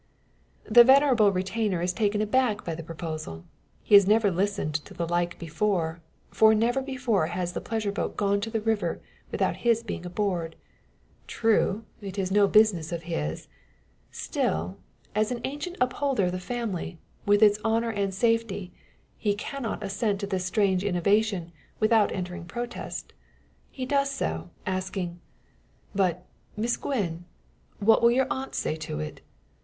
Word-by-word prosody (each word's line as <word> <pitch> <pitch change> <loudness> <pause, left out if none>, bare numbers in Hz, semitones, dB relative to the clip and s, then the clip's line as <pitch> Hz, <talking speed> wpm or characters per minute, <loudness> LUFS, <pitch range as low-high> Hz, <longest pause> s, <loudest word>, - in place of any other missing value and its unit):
The 240 +2 +8
venerable 260 -5 +5
retainer 190 0 -1
is 180 +1 0
taken 210 0 +1
aback 220 -1 +1
by 170 - -2
the 165 - -6
proposal. 155 - -6 0.4
He - - -2
has 200 -2 +9
never 215 -1 +4
listened 195 -3 -1
to 195 - -13
the 170 -2 -2
like 175 +1 0
before; 165 0 -1 0.3
for 220 0 +5
never 240 +5 +2
before 250 - 0
has 175 0 -3
the - - -3
pleasure 220 -2 -2
boat 200 - -3
gone 200 0 +1
to 225 +1 -2
river 220 -1 0 0.3
without - - 0
his 230 -1 +2
being 205 -5 -5
aboard. 180 -3 -2 0.7
True, 225 -1 +1 0.2
it 195 -1 -7
is 190 -1 -1
no 205 0 +5
business 195 -7 +4
of 170 -1 -4
his; 80 - -3 0.6
still, 85 +5 -2 0.3
as 215 +1 +1
an 245 - -2
ancient 295 +7 -4
upholder 255 -2 +1
of 180 - 0
the 180 - -3
family, 190 -5 -4 0.3
with 205 +1 +5
its 210 0 +5
honour 225 +1 +1
and 200 -2 -1
safety, 215 -2 0 0.5
he 205 -1 +1
cannot 230 0 -4
assent 200 +1 -1
to - - -1
this 190 -2 -2
strange 190 -1 +1
innovation 200 -1 +1 0.3
without 215 -1 +4
entering 180 -1 -5
protest. 240 +6 -6 0.6
He 260 - -5
does 275 +1 +1
so, 80 - -3 0.2
asking: 185 -2 -3 0.7
"But, 180 -3 0 0.3
Miss 235 +3 +1
Gwen; 175 - -3 0.5
what 220 +2 +4
will 235 - +6
your 260 +2 +3
aunt 265 +1 -4
say - - -1
to 155 - -5
it? 75 0 -6
205 Hz, 150 wpm, -27 LUFS, 180-225 Hz, 0.7 s, has